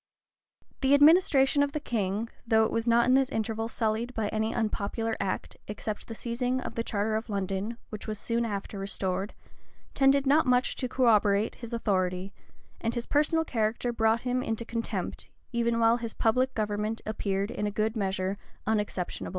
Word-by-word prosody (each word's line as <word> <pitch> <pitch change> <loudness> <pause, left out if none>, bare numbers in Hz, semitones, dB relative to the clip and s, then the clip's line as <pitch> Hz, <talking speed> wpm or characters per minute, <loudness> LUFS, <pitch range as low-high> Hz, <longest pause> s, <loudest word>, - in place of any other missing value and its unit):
The 270 +1 +4
administration 290 -2 +5
of 285 0 +1
the 305 - -1
king, 215 -4 -2 0.2
though 220 -1 +4
it - - -2
was 230 +1 -1
not 235 0 +5
in 255 - +4
this 265 0 +4
interval 225 0 -2
sullied 230 +2 -2
by 215 -2 -1
any 220 +1 -1
unpopular 225 +1 -1
act, 195 -1 -3
except 210 0 -5
the 225 - -6
seizing 245 +3 -1
of - - -5
the 230 - -2
charter 215 -1 -1
of 220 +1 -3
London,[] 200 +3 -2
which 215 - -7
was 215 -1 -3
soon 230 +3 -1
after 200 -2 -4
restored, 195 0 -2 0.6
tended 275 0 +4
not 285 +1 +4
much 250 0 +2
to 255 - -2
corroborate 215 -5 +3
his 235 -1 -7
authority; 190 -4 -1 0.5
and 230 +1 -2
his 240 0 -2
personal 320 +2 +2
character 230 -1 -1
brought 225 0 +2
him 250 0 0
into 225 -1 -2
contempt, 230 0 -4 0.2
even 235 -1 +1
while 230 +1 +4
his 230 -2 -6
public 255 +4 +1
government 210 +1 -1
appeared 200 -1 -2
in 210 - -2
a - - +1
good 215 +2 -1
measure 190 -1 -1 0.3
unexceptionable. 210 -4 -2
225 Hz, 175 wpm, -28 LUFS, 210-245 Hz, 0.6 s, administration